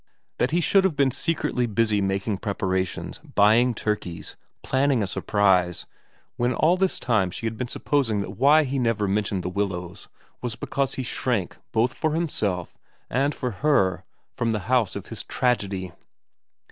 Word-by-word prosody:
That 125 - +2
he 170 +2 +1
should 190 +4 +4
have 190 -5 +1
been 140 -2 +3
secretly 140 -4 -1
busy 110 -1 +1
making 95 +1 -1
preparations, 95 -3 -2
buying 115 +4 +3
turkeys, 90 -7 -3 0.3
planning 135 -3 +2
a - - 0
surprise, 95 -2 +1 0.5
when 120 +1 +1
all 165 +3 +4
this 190 0 +1
time 110 -7 +1
she 100 - -6
had 115 0 -2
been 125 +2 -3
supposing 125 -5 0
that 95 - -5
why 145 +9 +5
he 135 -1 -2
never 115 -4 +1
mentioned 100 -1 -1
The 90 - -2
Willows 90 -2 -3 0.3
was 120 -2 -3
because 135 +1 -2
he 130 - -3
shrank 120 -6 -1 0.2
both 120 +3 +2
for 155 -1 -1
himself 105 - -1 0.4
and 140 +4 +1
for 125 -2 -3
her 115 -11 +2 0.3
from 120 - -1
the 110 -2 0
house 120 0 +1
of - - -5
his - - -5
tragedy 100 -7 -1
115 Hz, 160 wpm, -25 LUFS, 100-130 Hz, 0.5 s, why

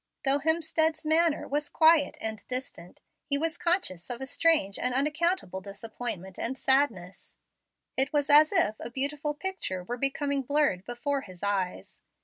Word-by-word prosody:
Though 275 +1 +4
Hemstead's 320 +1 +1
manner 320 0 +2
was 295 +1 -2
quiet 320 -2 +4
and 220 -2 -4
distant, 250 -9 -5 0.2
he 280 - 0
was 325 +2 -2
conscious 335 - -1
of 245 -1 -4
a 265 - -5
strange 270 -9 +1
and 250 0 0
unaccountable 300 - 0
disappointment 200 -1 -6
and 260 +3 -3
sadness. 265 -11 0 0.6
It 265 +1 +3
was 290 -1 0
as 305 +1 +7
if 215 +1 +2
a - - -6
beautiful 285 +4 -2
picture 295 - -3
were 240 +7 -5
becoming 280 +1 -1
blurred 270 -9 0
before 275 +3 -3
his 185 -4 -13
eyes. 195 -3 -3
275 Hz, 150 wpm, -28 LUFS, 215-305 Hz, 0.6 s, as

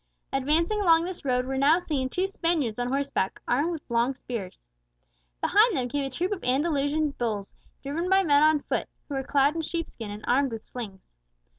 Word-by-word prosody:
Advancing 320 +10 +1
along 330 -3 +5
this 365 -2 -6
road 250 -2 +1
were 265 0 -2
now 295 +4 +5
seen 285 -7 -2
two 365 +7 0
Spaniards 330 - -1
on 245 - 0
horse 275 +2 -1
back, 190 -7 -1
armed 290 +8 +1
with 320 -3 -5
long 235 +2 +1
spears. 200 - -7 0.8
Behind 425 - +4
them 250 -1 -1
came 285 +2 -1
a 270 - -2
troop 355 +9 -2
of 400 - -3
Andalusian 285 +2 +1
bulls, 215 -7 -3 0.3
driven 320 +6 -2
by 385 0 +5
men 290 -4 +4
on 310 -1 +4
foot, - - -2 0.2
who 290 - -6
were 270 - -1
clad 280 +2 +3
in 330 - -2
sheep 335 +1 -4
skin, 225 -3 -7
and 205 +1 -7
armed 270 +1 +2
with 225 - -7
slings. 200 - -9
280 Hz, 200 wpm, -27 LUFS, 250-330 Hz, 0.8 s, along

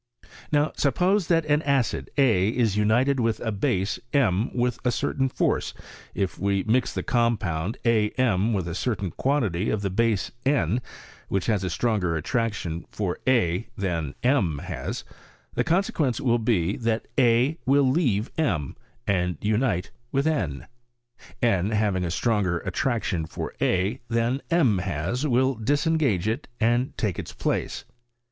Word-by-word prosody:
Now, 150 +1 +2
suppose 180 +7 +2
that 165 -2 +2
an 150 0 +2
acid 140 -5 0
a 110 -9 +4
is 115 -4 +1
united 120 +6 +2
with 115 -2 +1
a 110 - -1
base 100 +1 0
m 110 -6 +2
with 125 -1 -1
a 125 - +2
certain 135 +2 0
force, - - 0 0.4
if 95 -2 -2
we 100 0 +1
mix 120 +3 +1
the - - -3
com 120 -1 +2
pound 90 0 -3
a 110 -3 +3
m 115 -4 +2
with 95 -5 -1
a 85 - -3
certain 100 -2 -2
quantity 110 - 0
of 105 -1 -1
the 100 - -1
base 110 0 +1
n, 125 - +1 0.5
which 95 -2 -1
has 105 -4 +1
a 90 - -1
stronger 90 -2 0
attraction 90 -2 -2
for 95 -4 -3
a 115 -6 +2
than 85 -7 -2
m 115 - +2
has, - - -5 0.5
the - - +1
consequence 160 - +1
will 120 -2 +2
be, 105 -5 +1
that 115 -1 -1
a 125 +5 +3
will 140 0 +4
leave 130 - +1
m 85 - 0 0.3
and 90 -4 0
unite 105 -3 0 0.2
with 140 +1 +1
n; 95 - -1 0.4
— 120 - -22
n 100 -5 +2
having 105 -4 +1
a 85 - -1
stronger 95 -2 +1
attraction 110 -10 -1
for - - -5
a 95 +8 +1
than 115 +3 0
m 135 - +3
has, 105 - -2
will 130 +1 +3
disengage 140 - +1
it 115 +7 -2
and 120 +3 +1
take 105 -6 -1
its - - -6
place. - - -2
115 Hz, 155 wpm, -25 LUFS, 95-130 Hz, 0.5 s, a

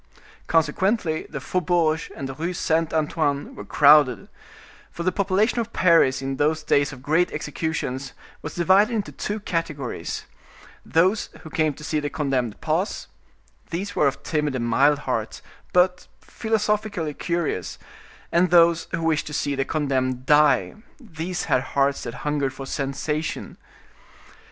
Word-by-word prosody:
Consequently, 165 +2 +1
the - - -5
faubourg 165 -3 0
and 135 - -5
the 135 - -6
Rue 165 +5 -3
Saint 165 -1 0
Antoine 150 -2 -1
were - - -8
crowded; 140 -2 +5 0.6
for 170 - -6
the 185 - +2
population 200 +5 +1
of 230 0 -3
Paris 165 -7 +4
in 135 0 -3
those 155 +1 +1
days 145 -1 +2
of 130 -2 -11
great 160 +5 +2
executions 150 -3 -3 0.3
was - - -7
divided 190 +6 +4
into 210 -2 -2
two 210 +1 -4
categories: 160 - -4 0.6
those 185 +6 +2
who 160 - -11
came 155 -3 +1
to 150 - -12
see 155 0 -1
the 145 0 -3
condemned 135 -6 -2
pass—these 175 +2 -5
were 150 - +3
of 135 - -3
timid 150 -3 -1
and 120 -2 -1
mild 140 +6 +4
hearts, 120 -6 -3 0.3
but 180 0 +2
philosophically 210 -7 -1
curious—and 170 - -3
those 170 -1 +5
who 165 -1 -3
wished 160 -2 +1
to 150 - -6
see 145 -2 -1
the 135 -1 -1
condemned 130 -4 -1
die—these 165 - +1
had 125 - +2
hearts 140 +1 0
that 120 - -6
hungered 145 -3 0
for 135 - -7
sensation. 145 +3 -3
155 Hz, 140 wpm, -23 LUFS, 140-175 Hz, 0.6 s, crowded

